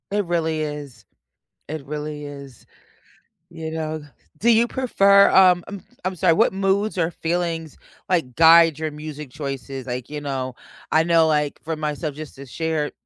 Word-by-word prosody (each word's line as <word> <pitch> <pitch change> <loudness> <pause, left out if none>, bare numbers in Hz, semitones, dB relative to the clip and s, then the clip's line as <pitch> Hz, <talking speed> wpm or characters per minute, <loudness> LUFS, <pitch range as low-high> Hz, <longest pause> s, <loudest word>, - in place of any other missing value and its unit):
It 205 0 0
really 160 -2 -1
is. 145 -7 -6 0.6
It 155 -2 -6
really 150 0 -5
is. 140 -4 -11 0.8
You 160 -2 -7
know? 155 -1 -4 0.4
Do 235 +3 +4
you 230 +1 +4
prefer, 200 -6 +4
um 180 -2 +6
I'm 200 -2 -8 0.2
I'm 185 0 -1
sorry 180 -1 +3
what 160 - +3
moods 195 +2 0
or 165 -2 +1
feelings, 165 -2 -3 0.3
like, 160 -10 0
guide 165 -1 +7
your 155 -1 -2
music 150 -2 -8
choices? 135 -2 -6
Like, 125 -1 -5
you 150 0 -5
know, 130 -3 -4 0.4
I 160 - +4
know, 165 -1 +4
like, 150 -2 0
for 160 0 -3
myself, 150 0 -3
just 155 -1 -9
to 140 - -10
share 155 +2 -2
155 Hz, 160 wpm, -22 LUFS, 145-175 Hz, 0.8 s, guide